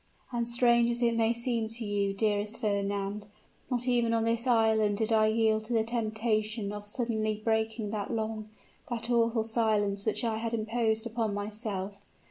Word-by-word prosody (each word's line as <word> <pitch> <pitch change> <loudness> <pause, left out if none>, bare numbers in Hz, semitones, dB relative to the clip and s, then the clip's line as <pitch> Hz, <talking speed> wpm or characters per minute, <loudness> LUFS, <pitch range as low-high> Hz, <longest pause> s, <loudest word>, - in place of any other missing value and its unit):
And 235 -1 -1
strange 235 0 +4
as 240 +1 0
it 235 -1 +3
may 225 0 +3
seem 235 -1 -1
to 225 0 -4
you, 200 -1 0
dearest 210 +1 0
Fernand, 200 -1 -2 0.4
not 245 -1 -1
even 240 -2 +2
on 225 - +1
this 230 +2 0
island 220 -3 +3
did 220 +1 +1
I 215 0 +5
yield 220 0 +2
to 240 - -3
the 225 -1 +3
temptation 220 -2 -1
of 205 0 -7
suddenly 215 -2 -1
breaking 220 -1 0
that 205 -2 -3
long, 220 -2 -3 0.4
that 240 0 -2
awful 230 -1 +3
silence 215 -3 +1
which 220 +3 0
I 225 -2 0
had 230 0 -2
imposed 220 0 0
upon 225 -2 -1
myself. 205 -1 -4
220 Hz, 170 wpm, -30 LUFS, 210-235 Hz, 0.4 s, I